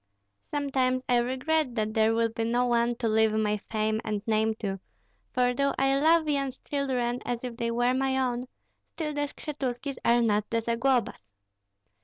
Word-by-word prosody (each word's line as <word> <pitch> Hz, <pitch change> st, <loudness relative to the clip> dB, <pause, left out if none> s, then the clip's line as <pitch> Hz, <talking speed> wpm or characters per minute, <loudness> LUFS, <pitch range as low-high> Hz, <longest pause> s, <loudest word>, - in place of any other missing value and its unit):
Sometimes 260 Hz, -3 st, 0 dB
I 245 Hz, -1 st, +4 dB
regret 260 Hz, +2 st, 0 dB
that 215 Hz, -1 st, -1 dB
there 220 Hz, 0 st, +3 dB
will 230 Hz, 0 st, +2 dB
be 225 Hz, 0 st, -3 dB
no 240 Hz, +2 st, +1 dB
one 240 Hz, 0 st, +2 dB
to 235 Hz, -1 st, -2 dB
leave 220 Hz, 0 st, +3 dB
my 210 Hz, -1 st, +1 dB
fame 215 Hz, 0 st, 0 dB
and 210 Hz, -2 st, -3 dB
name 220 Hz, 0 st, +1 dB
to; 195 Hz, -3 st, -4 dB, 0.5 s
for 250 Hz, 0 st, +2 dB
though 275 Hz, +2 st, 0 dB
I 270 Hz, 0 st, +2 dB
love 320 Hz, +1 st, +4 dB
Yan's 275 Hz, -3 st, -1 dB
children 255 Hz, -4 st, -2 dB
as 240 Hz, 0 st, -3 dB
if 245 Hz, -2 st, -5 dB
they 235 Hz, -1 st, -1 dB
were 245 Hz, +2 st, +1 dB
my 265 Hz, 0 st, +1 dB
own, 250 Hz, -1 st, -1 dB, 0.5 s
still 305 Hz, -2 st, -3 dB
the 290 Hz, 0 st, -1 dB
Skshetuskis 275 Hz, -2 st, -5 dB
are 235 Hz, 0 st, +4 dB
not 210 Hz, -2 st, +1 dB
the 230 Hz, -, +1 dB
Zaglobas." 235 Hz, +2 st, 0 dB
245 Hz, 175 wpm, -28 LUFS, 225-270 Hz, 0.5 s, I